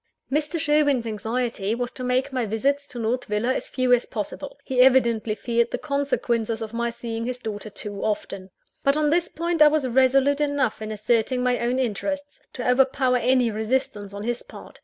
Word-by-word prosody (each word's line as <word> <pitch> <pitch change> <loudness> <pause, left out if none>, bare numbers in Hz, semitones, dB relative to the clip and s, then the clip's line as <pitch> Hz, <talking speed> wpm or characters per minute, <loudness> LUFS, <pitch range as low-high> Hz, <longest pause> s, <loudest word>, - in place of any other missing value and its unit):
Mr. 305 +3 0
Sherwin's 290 -5 +2
anxiety 225 -1 -2
was 245 0 -3
to 255 - -7
make 255 +2 0
my 255 -2 0
visits 280 +7 0
to 245 - -8
North 235 +2 -1
Villa 210 +5 0
as - - -4
few 255 -1 +2
as 245 - +2
possible: 240 +7 -5
he 255 -1 +2
evidently 235 -4 +4
feared 235 +1 0
the - - -2
consequences 240 -6 -1
of 220 0 -8
my 235 0 -1
seeing 230 0 -5
his 250 0 -3
daughter 215 -3 -6
too 205 -1 -4
often. 195 -3 -3 0.3
But 275 +2 +3
on 300 -1 +2
this 345 +2 +2
point, 335 0 -2
I 300 - +10
was 300 -3 +2
resolute 265 +3 +3
enough 285 -7 0
in 215 - -4
asserting 230 +4 0
my 250 -1 +1
own 240 +2 0
interests, 285 +4 -3
to 250 - -3
overpower 255 0 +3
any 250 -1 +2
resistance 215 -2 -2
on 200 +1 -7
his 240 +1 -2
part. - - -13
250 Hz, 190 wpm, -24 LUFS, 225-275 Hz, 0.3 s, I